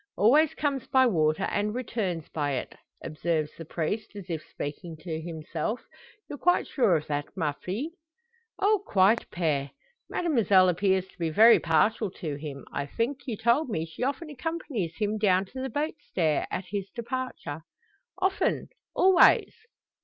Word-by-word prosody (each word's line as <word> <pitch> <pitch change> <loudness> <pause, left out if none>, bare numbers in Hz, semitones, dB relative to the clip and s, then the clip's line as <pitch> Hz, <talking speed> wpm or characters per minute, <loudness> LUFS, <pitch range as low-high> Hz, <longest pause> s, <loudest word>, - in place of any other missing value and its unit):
"Always 285 +9 +5
comes 280 -4 -1
by 260 -1 +5
water, 160 -5 +2
and 210 +2 -1
returns 205 -10 -3
by 145 -2 -2
it," 130 - -4 0.3
observes 155 -1 -1
the 165 - -9
priest, 205 +8 -3
as 190 -3 -7
if 160 -2 -2
speaking 155 +3 -7
to 160 0 -5
himself. 165 +6 -4 0.5
"You're 290 - -7
quite 355 +1 +3
sure 210 - +2
of 155 -1 -1
that, 145 -1 -2
ma 160 -6 0
fille?" 215 - -4 0.7
"Oh, 410 +1 +3
quite, 200 - +3
Pere!" 150 -5 -1 0.4
"Mademoiselle 210 - +4
appears 190 +1 +1
to - - -23
be 165 -1 0
very 220 +9 +7
partial 200 +7 +2
to 155 -5 -3
him. 145 -1 -7
I 140 - -2
think, 260 - -3
you 225 -4 -3
told 235 +6 +2
me 160 -7 -1
she 160 +5 -11
often 285 +5 -2
accompanies 275 - -3
him 215 0 -1
down 190 -2 +3
to 260 +7 -8
the 265 - -3
boat 295 +6 -1
stair, 160 - 0
at 185 - -3
his 200 -2 -3
departure?" 235 - -4 0.6
"Often! 380 0 0 0.3
always." 375 -1 +5
195 Hz, 160 wpm, -27 LUFS, 160-255 Hz, 0.7 s, very